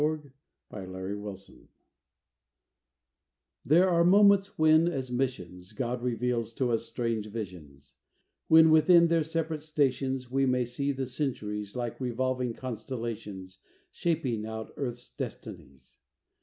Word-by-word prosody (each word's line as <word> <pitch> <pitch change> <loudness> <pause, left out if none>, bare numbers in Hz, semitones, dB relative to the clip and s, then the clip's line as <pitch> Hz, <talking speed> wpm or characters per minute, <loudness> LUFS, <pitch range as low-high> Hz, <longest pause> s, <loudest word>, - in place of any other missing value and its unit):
THE 150 - +4 0.7
END 95 -3 -7
OF 95 +2 -5
THE 105 -2 -5
CENTURY 95 +1 -17 1.9
There 175 +6 +5
are 170 -2 +3
moments 200 +2 +5
when, 155 +1 +5
as 130 -7 -3
missions, 95 -9 -3
God 125 -1 -3
reveals 120 -1 -1
to 125 0 0
us 115 - -1
strange 115 -2 -2
visions; 85 - -8 0.5
When, 160 0 +7
within 170 +2 +6
their 165 -1 +3
separate 160 0 -2
stations, 135 -4 -1
We 135 0 +2
may 125 -1 +1
see 140 +4 -2
the 135 -1 -3
Centuries, 105 -6 -4
Like 120 +1 -4
revolving 125 -1 -1
constellations 115 -7 -6 0.3
Shaping 130 -10 -1
out 110 0 -6
Earth's 120 -3 -5
destinies. 70 -1 -9
125 Hz, 125 wpm, -29 LUFS, 110-150 Hz, 1.9 s, When